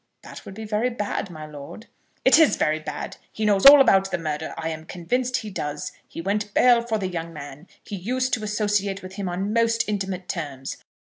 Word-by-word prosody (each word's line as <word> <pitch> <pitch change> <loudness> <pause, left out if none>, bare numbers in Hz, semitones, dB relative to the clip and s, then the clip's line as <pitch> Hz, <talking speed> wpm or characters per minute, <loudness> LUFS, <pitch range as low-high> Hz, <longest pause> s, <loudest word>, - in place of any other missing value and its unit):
"That - - -11
would 190 - -9
be 220 +1 -7
very 215 +3 0
bad, 210 -4 -3
my 155 -3 -8
lord." 150 +8 -10 0.4
"It 270 +4 +7
is 320 - +5
very 155 +1 +1
bad. 150 -1 -6
He 220 - -3
knows 205 +2 +6
all 285 +1 +11
about 195 -7 +5
the - - -1
murder; 155 -1 -4
I 160 - -3
am 160 -1 -5
convinced 245 +10 -1
he 215 -3 -6
does. 150 -5 -4 0.2
He - - -7
went 205 +3 -2
bail 245 -1 +6
for 230 -2 -1
the 195 -3 -2
young 170 -2 -5
man. 145 +2 -10 0.2
He 200 - -6
used 255 +7 -1
to 220 -6 0
associate 205 -2 0
with 185 0 -9
him 195 -3 -2
on 190 +4 -2
most 230 0 +2
intimate 195 -3 -3
terms. 140 -7 -5
195 Hz, 210 wpm, -24 LUFS, 165-220 Hz, 0.4 s, all